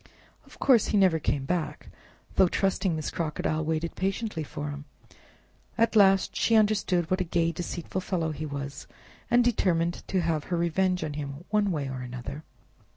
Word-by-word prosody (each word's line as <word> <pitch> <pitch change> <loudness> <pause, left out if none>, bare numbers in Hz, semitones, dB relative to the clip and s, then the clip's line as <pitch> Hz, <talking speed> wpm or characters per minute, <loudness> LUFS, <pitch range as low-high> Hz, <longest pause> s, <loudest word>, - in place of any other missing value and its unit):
Of - - -16
course 250 -6 +4
he 210 - +1
never 185 -5 +4
came 140 -2 -1
back, 175 0 -3 0.4
though 190 - +5
trusting 190 -1 0
Miss 155 - -3
Crocodile 155 -1 -1
waited 160 +1 -2
patiently 195 -1 -2
for 145 0 -5
him; 145 0 -8 0.9
at 230 0 +2
last 195 -2 +5
she 230 - +2
understood 205 -6 +2
what 185 0 +2
a - - +2
gay, 170 -1 +1
deceitful 175 +2 -4
fellow 170 -4 -1
he 155 +1 -5
was, 140 -1 -6 0.4
and 240 0 +5
determined 175 -8 +1
to 185 - +1
have 160 -3 -1
her 175 - -1
revenge 180 +1 +1
on 150 -2 -3
him 145 +2 -6
one 210 -1 +2
way 150 -6 -2
or 130 -1 -5
another. 125 +4 -7
170 Hz, 170 wpm, -27 LUFS, 155-190 Hz, 0.9 s, though